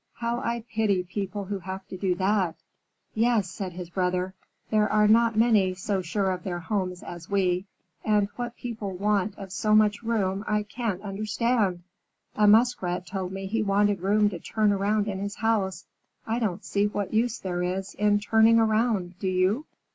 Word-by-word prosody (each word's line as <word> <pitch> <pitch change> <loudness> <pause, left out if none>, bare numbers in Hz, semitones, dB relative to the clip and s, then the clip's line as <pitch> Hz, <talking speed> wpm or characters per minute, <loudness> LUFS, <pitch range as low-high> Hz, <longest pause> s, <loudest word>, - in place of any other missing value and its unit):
How 235 0 -2
I 235 -2 -2
pity 215 -5 +1
people 195 +2 -4
who 200 0 -4
have 190 +1 -7
to - - -6
do 185 -1 0
that!" 190 -2 +1 0.6
"Yes," 220 -4 +2
said 190 -3 -5
his 175 -1 -8
brother. 180 0 -1 0.4
"There 215 -1 +2
are 210 0 +4
not 225 +1 +4
many 215 -5 +4
so 190 +1 -1
sure 190 +2 0
of 180 -1 -4
their 180 -2 -3
homes 180 +1 -3
as 170 -1 -9
we. 185 -2 +1 0.4
And 210 -2 +2
what 240 -1 -5
people 215 -6 -5
want 205 0 0
of 195 -2 -8
so 215 +2 +2
much 210 0 +3
room, 205 -4 -1
I 210 0 +1
can't 210 -2 -4
understand! 210 -2 0 0.5
A 210 -1 +4
Muskrat 205 -5 +3
told 190 -2 -4
me 195 0 -5
he 220 +4 -1
wanted 205 -1 +2
room 210 +2 +3
to 175 - -6
turn 215 +2 +1
around 205 +1 +1
in 195 -2 -3
his 200 +1 -4
house. 195 -5 0 0.4
I 225 +2 -1
don't 205 -4 -2
see 205 +1 +1
what 205 -1 -3
use 230 +1 +1
there 180 -2 -3
is 185 +2 -2
in 205 0 +2
turning 220 +2 +4
round, 215 -5 +1
do 190 - -2
you?" 185 +9 +1
205 Hz, 180 wpm, -26 LUFS, 185-215 Hz, 0.6 s, are